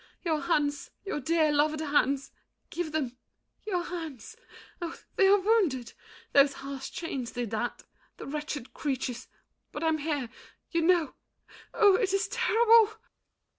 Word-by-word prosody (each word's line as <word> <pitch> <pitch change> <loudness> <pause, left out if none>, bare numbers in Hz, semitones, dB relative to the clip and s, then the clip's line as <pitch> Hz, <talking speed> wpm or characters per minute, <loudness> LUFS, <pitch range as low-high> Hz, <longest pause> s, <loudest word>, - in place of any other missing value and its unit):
Your 320 -4 0
hands, 295 -4 0 0.2
your 390 - -2
dear 315 +2 +2
loved 300 +1 +2
hands, 285 -2 +1 0.4
give 345 -3 -3
them—your 315 - -5
hands! 330 - -7 0.5
Oh, 335 -1 -4 0.2
they 385 - +5
are 400 +1 +7
wounded! 370 - +1 0.4
Those 280 0 +6
harsh 275 -1 -7
chains 270 -8 -4
did 240 -3 -3
that. 230 +2 -3 0.3
The - - -8
wretched 295 -3 -5
creatures! 260 -4 -3 0.4
But - - -5
I'm 320 -1 +2
here—you 295 +3 -4
know— 330 -4 +3 0.6
Oh, 400 -3 +6
it 400 -5 0
is 395 0 +1
terrible! 460 -2 +5
310 Hz, 130 wpm, -29 LUFS, 275-360 Hz, 0.6 s, are